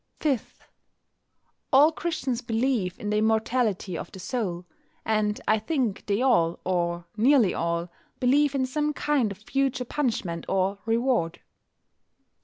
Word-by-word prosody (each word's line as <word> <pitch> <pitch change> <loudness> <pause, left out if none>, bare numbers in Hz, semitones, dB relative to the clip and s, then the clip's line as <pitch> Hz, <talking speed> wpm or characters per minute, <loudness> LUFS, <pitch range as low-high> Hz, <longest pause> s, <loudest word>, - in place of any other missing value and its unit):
5. 275 -7 -2 1.1
All 290 +3 +7
Christians 295 -8 -2
believe 230 -5 0
in 210 - -3
the 210 - +2
immortality 220 -3 +1
of - - -6
the - - -10
soul. 185 -5 -3 0.4
And 215 -1 +1
I 215 - +4
think 235 -4 -2
they 205 +4 +1
all, 170 -11 +3
or 175 -1 -1
nearly 235 -3 +4
all, 170 +1 -1 0.3
believe 280 +3 +3
in 260 -1 +1
some 300 +3 -1
kind 280 -8 +1
of 195 - -7
future 255 +3 -1
punishment 220 - -2
or 195 +1 0
reward. 225 -8 +1
225 Hz, 130 wpm, -26 LUFS, 190-265 Hz, 1.1 s, All